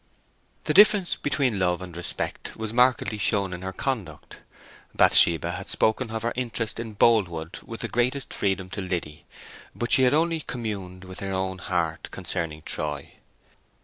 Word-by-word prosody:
The - - 0
difference 205 -3 +6
between 140 -7 0
love 90 -1 +1
and 90 -2 -9
respect 85 - -3
was 110 0 -4
markedly 125 -3 +2
shown 100 -3 +2
in 90 - -6
her 95 0 -4
conduct. 95 - -4 0.6
Bathsheba 85 0 +5
had 95 +2 -6
spoken 110 +2 +1
of 110 0 -4
her 115 - -1
interest 115 -3 -2
in 115 -2 -5
Boldwood 90 -8 +2
with 115 - -8
the - - -2
greatest 125 +3 -1
freedom 95 -2 -1
to 100 - -4
Liddy, 85 -5 -4 0.5
but 120 - -3
she - - +6
had 130 +2 +4
only 165 +1 +1
communed 100 -8 -5
with 95 0 -8
her 95 -1 -3
own 95 0 -2
heart 85 -3 -2
concerning 80 -2 -4
Troy. 75 -2 -3
100 Hz, 160 wpm, -25 LUFS, 90-120 Hz, 0.6 s, difference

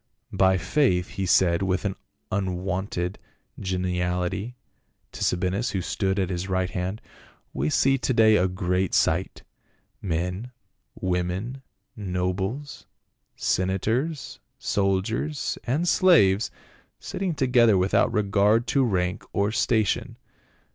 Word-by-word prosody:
" - - -49
By 95 0 +4
my - - +2
faith," 90 - +1
he 95 -1 -3
said 85 -1 +3
with 95 0 0 0.5
unwonted 95 -1 -2 0.4
geniality 90 +3 -2 0.6
to - - -5
Sabinus 95 +6 0
who 95 - -1
stood 95 +1 -1
at 95 -1 0
his 90 +2 -3
right 95 -1 0
hand, 95 +4 -3 0.3
" - - -32
we 70 +3 -1
see 135 - +3
to 130 - -1
day 110 -2 +5
a 95 -2 +3
great 90 0 -1
sight. - - +1 0.6
Men, 90 +6 -2 0.5
women, 95 +8 -2 0.3
nobles, 95 +8 -3 0.5
senators, 115 - -1 0.2
soldiers 100 +9 -1
and 150 +8 0
slaves 115 - +4 0.5
sitting 185 -4 -3
together 120 -6 +4
without 95 +2 +2
regard 105 +2 +2
to 140 - +3
rank 90 -6 0
or 100 +1 +1
station. 110 -1 0
95 Hz, 115 wpm, -25 LUFS, 90-115 Hz, 0.6 s, day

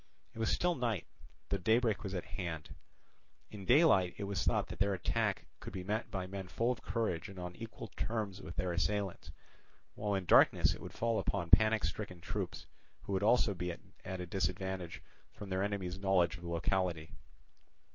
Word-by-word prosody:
It - - -10
was 110 - +1
still 180 0 +2
night, 120 - -1 0.4
though 100 - +1
daybreak 110 +3 +3
was 100 -3 -4
at 90 - -3
hand: 85 -4 -5 0.8
in 100 -3 -8
daylight 100 - +5
it 100 - -4
was 100 -3 -1
thought - - +2
that - - -7
their 100 0 +2
attack - - 0 0.2
would - - -7
be 95 -2 -4
met 105 +4 -2
by 95 -4 -3
men 95 0 -6
full 115 +6 +1
of 125 - -4
courage 95 -9 -1
and 100 - -10
on 90 -1 -5
equal 115 +4 -7
terms 105 -4 -3
with 85 - -8
their 90 0 -1
assailants, 100 +2 -1 0.6
while 105 -1 -1
in 95 -2 -2
darkness - - +6
it - - -10
would - - -8
fall 115 -1 +1
upon 85 -1 -2
panic 110 +2 +6
stricken 90 +2 -3
troops, - - -4 0.4
who 100 - -4
would 95 - +1
also 110 0 +4
be 90 -1 -3
at 90 +2 -8
a 90 - -3
disadvantage 95 -1 -2 0.3
from 105 -2 -8
their 95 0 0
enemy's 95 -2 -2
knowledge 95 -4 +3
of 85 - -11
the 85 - -6
locality. 85 -1 0
95 Hz, 185 wpm, -34 LUFS, 90-105 Hz, 0.8 s, darkness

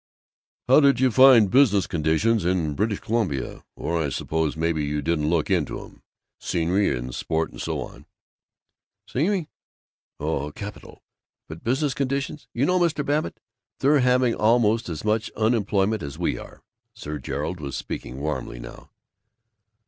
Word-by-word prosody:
"How 130 +4 +7
did 140 -4 +4
you 130 -1 +3
find 125 -5 +7
business 110 -7 +4
conditions 85 +8 +1
in 85 -4 0
British 105 +5 -1
Columbia? 105 - -2
Or 85 0 -2
I 75 - -1
suppose 80 +3 -2
maybe 80 -1 0
you 75 +1 -1
didn't 75 -1 0
look 85 +2 0
into 85 -7 0
'em. - - -18 0.4
Scenery 85 -1 0
and - - -6
sport 80 +4 -2
and - - -9
so - - -2
on?" - - -10 1.0
"Scenery? 170 +4 0 0.7
Oh, 75 +2 -2
capital. 105 0 -9 0.4
But 80 +2 -10
business 135 +4 0
conditions 140 +2 -3
You 125 +4 0
know, 180 +2 +2
Mr. 155 -4 +1
Babbitt, 150 +2 -1 0.4
they're 145 +2 +3
having 125 -1 +3
almost 115 -1 +2
as 80 +3 -5
much 110 +1 +1
unemployment 110 -2 +1
as 70 -1 -6
we - - 0
are." - - -11 0.3
Sir 75 0 -6
Gerald 70 +6 -4
was 70 -3 -5
speaking 65 +2 -6
warmly 75 -4 -4
now. - - -11
100 Hz, 150 wpm, -24 LUFS, 80-125 Hz, 1.0 s, How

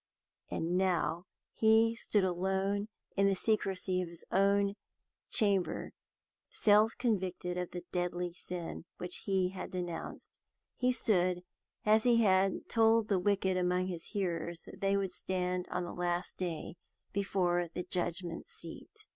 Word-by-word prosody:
And 170 +2 -1
now 180 -1 0 0.3
he 225 +1 +5
stood 210 -3 +1
alone 190 +3 0 0.3
in 195 0 +4
the 195 - +3
secrecy 190 -3 0
of 180 - -4
his 170 -1 -12
own 200 +1 +3 0.6
chamber 200 -4 +1 0.6
self 215 +1 +4
convicted 185 -6 -1
of 180 -1 -2
the 175 -1 -6
deadly 175 -1 -1
sin 175 -1 -6
which 180 0 -3
he 190 -2 +2
had 185 0 -6
denounced 175 -2 -6 0.4
he 250 0 +2
stood, 180 -7 +1 0.4
as 215 +1 +5
he 240 0 +4
had 195 -3 +3
told 225 -1 +4
the 195 -3 +3
wicked 190 -1 +1
among 180 0 +1
his 175 -3 -4
hearers 170 -3 -2
that - - -13
they 195 0 +3
would 195 -2 -1
stand 180 -1 -2
at - - -1
the 175 - -5
Last 175 0 -2
Day, 170 -2 -4 0.4
before 180 -3 +1
the 180 - -3
Judgment 175 -1 -3
Seat. 435 - -10
185 Hz, 140 wpm, -33 LUFS, 180-200 Hz, 0.6 s, he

